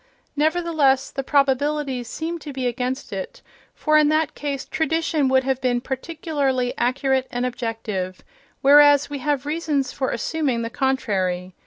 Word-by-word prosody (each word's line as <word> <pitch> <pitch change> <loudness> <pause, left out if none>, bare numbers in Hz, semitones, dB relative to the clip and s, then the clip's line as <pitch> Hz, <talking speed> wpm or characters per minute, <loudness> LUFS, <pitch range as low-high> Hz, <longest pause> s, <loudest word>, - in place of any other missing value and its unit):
Nevertheless, 310 -3 +2
the 270 - -3
probabilities 275 -2 0
seem 335 +5 -4
to 300 - -8
be 260 -2 -4
against 250 +2 -3
it, - - -6 0.3
for 305 0 +3
in 300 -1 +4
that 310 -1 +1
case 280 -2 -4
tradition 320 -2 0
would 260 0 +3
have 265 0 -1
been 245 -2 +1
particularly 270 -2 -2
accurate 260 +1 0
and 245 0 -2
objective, 225 -7 -4 0.4
whereas 290 0 +6
we 285 - -4
have 280 0 -1
reasons 300 -3 -1
for 260 - -2
assuming 275 -8 -1
the 230 - -4
contrary. 190 -10 -1
270 Hz, 145 wpm, -22 LUFS, 250-300 Hz, 0.4 s, whereas